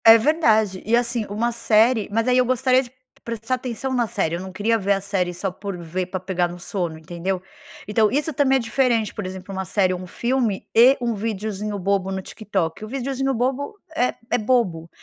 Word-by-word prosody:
É 225 0 +10
verdade, 220 - +2
e 225 +3 +2
assim, 235 -2 0
uma 225 +4 0
série, 225 0 +3
mas 225 +3 +1
aí, 250 0 +4
eu 250 - +4
gostaria 255 +1 +3
de 245 -3 -10 0.3
prestar 230 +1 -3
atenção 255 +1 -3
na 240 -2 +1
série, 180 -6 -1
eu - - -4
não 190 0 -7
queria 210 +4 +1
ver 200 0 +2
a 195 - -1
série 190 -2 -1
só 180 +2 -3
por 195 0 -6
ver 175 +2 -3
pra 185 0 -4
pegar 180 -1 0
no 175 +1 -8
sono, 175 -2 -3
entendeu? 175 +4 -3 0.5
Então, 210 +1 +3
isso 295 +6 0
também 270 -1 +3
é - - +4
diferente, 230 -2 +1
por - - -4
exemplo, 185 +1 -7
uma 190 0 -2
série 185 0 +1
ou 180 - -4
um 185 - -8
filme 235 -1 -1
e 250 +4 +7
um 240 -1 0
videozinho 210 -1 -3
bobo 195 0 0
no 190 - -2
TikTok, 190 -3 -3
o - - -5
videozinho 270 +2 -2
bobo 265 - -1 0.2
é 250 -3 +1 0.2
é - - +4
bobo, 210 -9 +1
215 Hz, 210 wpm, -22 LUFS, 190-245 Hz, 0.5 s, É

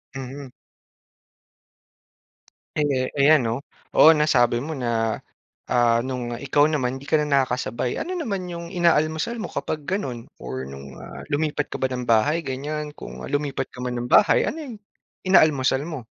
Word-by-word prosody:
Mhm. 135 +1 -7 2.3
Eh, 135 -4 +1
ayan 145 +1 +6
'no. 115 -1 -1 0.4
Oo 160 - +9
nasabi 125 -6 +3
mo 155 +1 -5
na 115 -3 0 0.5
ah, 120 -2 +4
no'ng 125 -2 -4
ikaw 145 +2 +3
naman 135 -4 -1
'di 140 - -12
ka - - +4
na 150 - 0
nakakasabay. 130 -4 0
Ano 365 - -3
naman 210 - -3
'yong 170 -1 -6
inaalmusal 170 +5 +1
mo - - -4
kapag 155 -1 -3
gano'n 130 - -3
or 65 0 -5
no'ng, 70 0 -10
ah, - - -9
lumipat 150 -1 0
ka - - -3
ba 130 - +1
ng 125 -1 -4
bahay 145 +9 +2
ganyan? 150 +3 -4
Kung - - -9
lumipat 145 -2 -2
ka 125 - -8
man 125 -1 -3
ng 120 - -3
bahay - - +5
ano - - -3
'yong 265 -7 -7 0.5
inaalmusal 145 -7 +4
mo? 145 -8 -6
140 Hz, 155 wpm, -23 LUFS, 125-155 Hz, 2.3 s, Oo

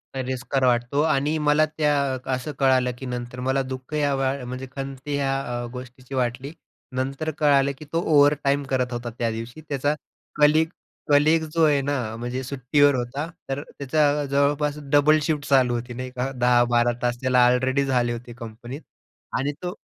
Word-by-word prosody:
तिरस्कार 130 +1 -2
वाटतो 125 +3 +2
आणि 150 0 +1
मला 150 +1 +3
त्या 150 -1 0 0.4
असं 130 +4 -3
कळालं, 130 -2 +3
की 135 - -8
नंतर 125 0 -5
मला 130 +2 +1
दुःख 130 +2 -7
या 145 -2 +1 0.3
म्हणजे 130 +2 -6
खंत 135 -1 -5
ह्या 140 -2 0 0.3
अ, - - -4
गोष्टीची 125 +1 -9
वाटली 125 +2 -2 0.4
नंतर 135 +4 -2
कळालं 140 -2 +3
की 155 - -10
तो 165 - +2
ओव्हरटाईम 145 -2 +3
करत 125 -2 0
होता 120 0 -4
त्यादिवशी. 115 +5 -4
त्याचा 145 +1 0 0.5
कलीग 155 +2 +5 0.4
कलीग 155 +3 +4
जो 165 -1 +3
आहे 145 -2 +3
ना, 130 -6 -2
म्हणजे 125 +2 -4
सुट्टीवर 140 +2 +2
होता. 130 +6 -3 0.2
तर 135 +1 -2
त्याचा 145 +1 +1
जवळपास 140 +1 +1 0.2
डबल 150 +2 +5
शिफ्ट 150 -1 -1
चालू 130 -3 +4
होती 120 +1 -4
नाही 130 +1 -5
का, 130 +2 -2
10-12 120 -1 +3
तास 120 -1 0
त्याला 125 -1 +4
ऑलरेडी 130 +3 +2
झाले 125 -3 +1
होते 120 0 -8
कंपनीत. 120 +5 -8 0.6
आणि 140 +3 0
तो 180 0 -4
135 Hz, 160 wpm, -24 LUFS, 125-145 Hz, 0.6 s, कलीग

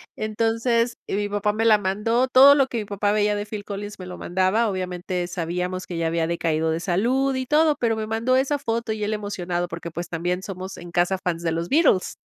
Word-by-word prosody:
Entonces,y 230 +1 -1
mi 205 0 -1
papá 205 0 0
me 225 +1 0
la 215 -2 +6
mandó, 210 +6 0
todo 265 +2 +8
lo 275 -2 +3
que 240 - -4
mi 210 - -4
papá 205 0 -1
veía 210 0 +2
de 205 0 -3
Phil 210 -1 -6
Collins 205 +1 -6
me 185 - -7
lo 180 0 -8
mandaba. 190 +6 +1
Obviamente, 180 -1 -3
sabíamos 180 +1 -3
que 175 - -5
ya 165 0 0
había 165 0 0
decaído 160 -1 0
de 160 - -1
salud 245 +10 +1
y 260 0 -2
todo, 305 +2 +4
pero 225 -2 +1
me 220 0 -4
mandó 225 +4 +1
esa 275 +2 +1
foto, 230 -3 -2
y 215 -1 -3
él 210 - -1
emocionado 180 -4 -3
porque, 170 0 -7
pues, 175 +1 -6
también 175 +2 -2
somos 190 -1 -7
en 175 0 -10
casa 175 +2 +1
fans 170 -2 -3
de 165 - 0
los 165 +1 -3
Beatles. 290 - +3
205 Hz, 225 wpm, -23 LUFS, 180-230 Hz, -, todo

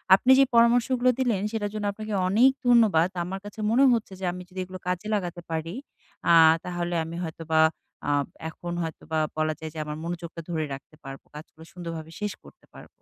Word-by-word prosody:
আপনি 250 +7 +3
যে 275 - +8
পরামর্শগুলো 245 +2 +4
দিলেন 235 -7 +1
সেটার 205 -2 -2
জন্য 210 -1 -3
আপনাকে 215 0 -6
অনেক 230 +8 +5 0.2
ধন্যবাদ। 210 -8 +5
আমার 190 +2 -5
কাছে 205 +1 -10
মনে 260 +4 +5
হচ্ছে 225 -4 -2
যে 190 - -3
আমি 180 - -7
যদি 185 0 -8
এগুলো 185 0 -9
কাজে 180 +3 -2
লাগাতে 175 -3 -3
পারি 165 +1 -3 0.6
আ - - +7 0.3
তাহলে 175 -1 -3
আমি 165 - -7
হয়তোবা 160 -1 -1 0.5
আ - - +1 0.4
এখন 175 +2 -7
হয়তোবা 160 0 -4 0.2
বলা 155 0 +1
যায় 160 0 -6
যে, - - -10
আমার 150 0 -5
মনোযোগটা 170 0 -5
ধরে 160 -2 -1
রাখতে 135 +3 -11
পারবো। 135 -1 -9
কাজগুলো 160 +1 -12
সুন্দরভাবে 165 -2 -7
শেষ 210 -1 -2
করতে - - -18
পারবো। - - -13
180 Hz, 185 wpm, -26 LUFS, 160-215 Hz, 0.6 s, যে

